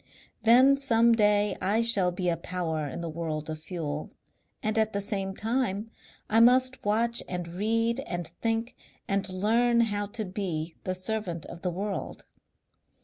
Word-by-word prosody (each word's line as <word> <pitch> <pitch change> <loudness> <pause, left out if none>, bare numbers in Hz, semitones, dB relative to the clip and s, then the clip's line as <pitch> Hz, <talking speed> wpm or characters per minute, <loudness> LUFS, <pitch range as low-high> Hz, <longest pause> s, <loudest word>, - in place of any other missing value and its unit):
Then 250 +5 +6
some 235 -4 +3
day 210 -2 +3
I 205 +5 +2
shall 200 -6 +4
be 180 +1 -3
a 170 - +2
power 165 -3 -3
in 140 - -6
the 170 - -4
world 155 -1 -4
of 155 0 -7
fuel. 155 -3 -5 0.5
And 215 0 0
at 220 0 +1
the 200 - 0
same 195 -1 -2
time 225 -2 -1 0.4
I 225 - +3
must 255 +2 +4
watch 230 +3 +2
and 180 -2 -4
read 230 +6 0
and 175 -1 -3 0.2
think 225 +1 -1 0.3
and 195 0 0
learn 230 +6 +2
how 205 -2 0
to 215 +1 -5
be 175 -4 -4
the 185 - -1
servant 185 -3 -3
of 170 - -10
the 180 - -1
world.... 195 +3 -4
205 Hz, 160 wpm, -28 LUFS, 175-230 Hz, 0.5 s, Then